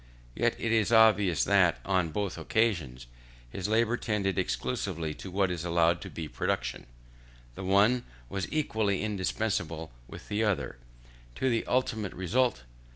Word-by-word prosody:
Yet -, -, +1 dB
it 115 Hz, -, -2 dB
is 110 Hz, -1 st, +2 dB
obvious 105 Hz, -8 st, +5 dB
that, 95 Hz, -5 st, +3 dB
on 95 Hz, -4 st, +1 dB
both 100 Hz, +4 st, -2 dB
occasions, 85 Hz, -, 0 dB, 0.5 s
his 95 Hz, +6 st, -3 dB
labour 115 Hz, +2 st, +2 dB
tended 100 Hz, -5 st, -1 dB
exclusively 90 Hz, -5 st, -2 dB
to 95 Hz, -, -9 dB
what 95 Hz, 0 st, +1 dB
is 85 Hz, -2 st, -3 dB
allowed 85 Hz, 0 st, +2 dB
to -, -, -7 dB
be 80 Hz, -2 st, -6 dB
production: 60 Hz, -4 st, -3 dB, 0.7 s
the 95 Hz, -, -7 dB
one 100 Hz, +6 st, +3 dB, 0.2 s
was 95 Hz, +10 st, -4 dB
equally 110 Hz, -10 st, 0 dB
indispensable 95 Hz, -, -2 dB, 0.2 s
with -, -, -11 dB
the 105 Hz, +2 st, 0 dB
other, 100 Hz, -, -1 dB, 0.6 s
to 130 Hz, -, +1 dB
the 115 Hz, -, 0 dB
ultimate 110 Hz, -5 st, 0 dB
result. 95 Hz, -, 0 dB
100 Hz, 145 wpm, -29 LUFS, 85-110 Hz, 0.7 s, obvious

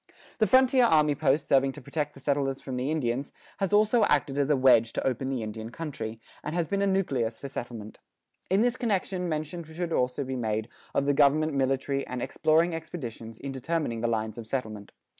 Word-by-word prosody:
The 215 Hz, -, +4 dB
frontier 260 Hz, +3 st, +5 dB
army 150 Hz, -8 st, +4 dB
post, 140 Hz, +1 st, +1 dB
serving 135 Hz, 0 st, +3 dB
to 145 Hz, -, -10 dB
protect 150 Hz, +2 st, -3 dB
the -, -, -11 dB
settlers 135 Hz, -1 st, 0 dB
from 130 Hz, -, -6 dB
the 125 Hz, +3 st, -1 dB
Indians, 140 Hz, -3 st, -1 dB, 0.3 s
has 195 Hz, -1 st, 0 dB
also 215 Hz, +2 st, +4 dB
acted 145 Hz, -4 st, +1 dB
as 140 Hz, 0 st, +1 dB
a 150 Hz, -, +5 dB
wedge 125 Hz, -3 st, +5 dB
to -, -, -2 dB
open 130 Hz, +1 st, -1 dB
the 130 Hz, -4 st, -2 dB
Indian 110 Hz, +1 st, -6 dB
country, 125 Hz, -6 st, -6 dB, 0.2 s
and 150 Hz, -, -4 dB
has 170 Hz, -2 st, 0 dB
been 200 Hz, +4 st, -1 dB
a 200 Hz, -, +2 dB
nucleus 135 Hz, -13 st, 0 dB
for 140 Hz, -, -7 dB
settlement.[16:3] 120 Hz, -5 st, -7 dB, 0.5 s
In 195 Hz, +2 st, +3 dB
this 245 Hz, +1 st, +2 dB
connection 190 Hz, -5 st, -1 dB
mention 155 Hz, +2 st, -3 dB
should 165 Hz, +2 st, -4 dB
also 125 Hz, +3 st, 0 dB
be 130 Hz, 0 st, -4 dB
made 110 Hz, -2 st, -2 dB, 0.3 s
of 140 Hz, -, +2 dB
the 145 Hz, -, +3 dB
government 150 Hz, +2 st, +3 dB
military 135 Hz, 0 st, 0 dB
and 125 Hz, -, -4 dB
exploring 160 Hz, +7 st, +2 dB
expeditions 120 Hz, -9 st, -7 dB
in 140 Hz, +3 st, -6 dB
determining 135 Hz, -3 st, -2 dB
the 120 Hz, -, +1 dB
lines 110 Hz, -1 st, -2 dB
of 115 Hz, -, -8 dB
settlement. 110 Hz, -5 st, -4 dB
140 Hz, 200 wpm, -28 LUFS, 125-165 Hz, 0.5 s, frontier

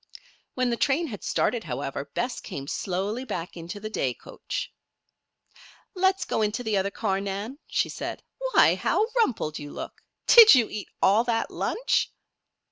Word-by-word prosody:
When 255 Hz, -1 st, +1 dB
the 235 Hz, -, -1 dB
train 290 Hz, +7 st, +2 dB
had 205 Hz, -5 st, -8 dB
started, 235 Hz, -6 st, 0 dB
however, 140 Hz, 0 st, -4 dB
Bess 245 Hz, +1 st, -1 dB
came 140 Hz, -9 st, -6 dB
slowly 195 Hz, -, -2 dB
back 190 Hz, -7 st, -5 dB
into 170 Hz, +4 st, -7 dB
the 215 Hz, -, -5 dB
day 130 Hz, -, -1 dB
coach. -, -, -6 dB, 1.2 s
"Let's 380 Hz, 0 st, +2 dB
go -, -, -1 dB
into 215 Hz, +3 st, -1 dB
the 220 Hz, -2 st, 0 dB
other 195 Hz, 0 st, +1 dB
car, 195 Hz, -2 st, -1 dB
Nan," 200 Hz, +7 st, -5 dB
she -, -, 0 dB
said. -, -, -6 dB, 0.3 s
"Why! -, -, +6 dB
how 430 Hz, -, +1 dB
rumpled 225 Hz, -, +1 dB
you 145 Hz, 0 st, -8 dB
look! -, -, -8 dB, 0.2 s
Did 455 Hz, -, +10 dB
you 235 Hz, -4 st, +3 dB
eat 210 Hz, -, -6 dB, 0.2 s
all 205 Hz, +4 st, +5 dB
that 230 Hz, -2 st, -1 dB
lunch?" -, -, 0 dB
215 Hz, 160 wpm, -26 LUFS, 190-250 Hz, 1.2 s, Did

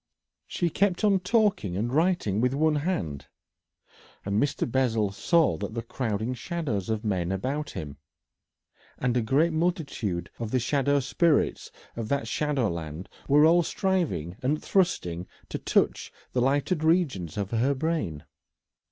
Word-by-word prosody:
She 175 Hz, -2 st, -1 dB
kept 195 Hz, +1 st, +1 dB
on 200 Hz, -2 st, +4 dB
talking 200 Hz, -, +1 dB
and 120 Hz, +5 st, -1 dB
writing 155 Hz, -, +1 dB
with 125 Hz, +2 st, +1 dB
one 155 Hz, +1 st, +2 dB
hand. 85 Hz, -, -2 dB, 1.0 s
And 100 Hz, +2 st, +1 dB
Mr. 145 Hz, -, 0 dB
Bessel 115 Hz, -5 st, +1 dB
saw 160 Hz, -, +2 dB
that 110 Hz, -, -5 dB
the 115 Hz, -, -3 dB
crowding 115 Hz, -1 st, -2 dB
shadows 125 Hz, -, -3 dB
of 110 Hz, 0 st, -2 dB
men 95 Hz, -4 st, 0 dB
about 135 Hz, +10 st, -2 dB
him, 70 Hz, -2 st, -6 dB, 1.0 s
and 125 Hz, -1 st, 0 dB
a 125 Hz, -, +3 dB
great 145 Hz, +9 st, +2 dB
multitude 155 Hz, -, -1 dB
of 115 Hz, -2 st, -3 dB
the 130 Hz, -, +1 dB
shadow 140 Hz, +3 st, +1 dB
spirits 155 Hz, +4 st, +1 dB, 0.3 s
of 115 Hz, -2 st, -4 dB
that 140 Hz, 0 st, 0 dB
shadowland, 95 Hz, -, -2 dB, 0.2 s
were 145 Hz, +2 st, +6 dB
all 170 Hz, +2 st, +6 dB
striving 155 Hz, -, -1 dB
and 145 Hz, +4 st, +1 dB
thrusting 90 Hz, -, 0 dB, 0.2 s
to -, -, -4 dB
touch -, -, +1 dB, 0.2 s
the 125 Hz, -, +1 dB
lighted 145 Hz, +5 st, +1 dB
regions 150 Hz, -, +1 dB
of 100 Hz, -1 st, -2 dB
her 125 Hz, +5 st, +2 dB
brain. 130 Hz, -, -2 dB
130 Hz, 145 wpm, -27 LUFS, 100-160 Hz, 1.0 s, were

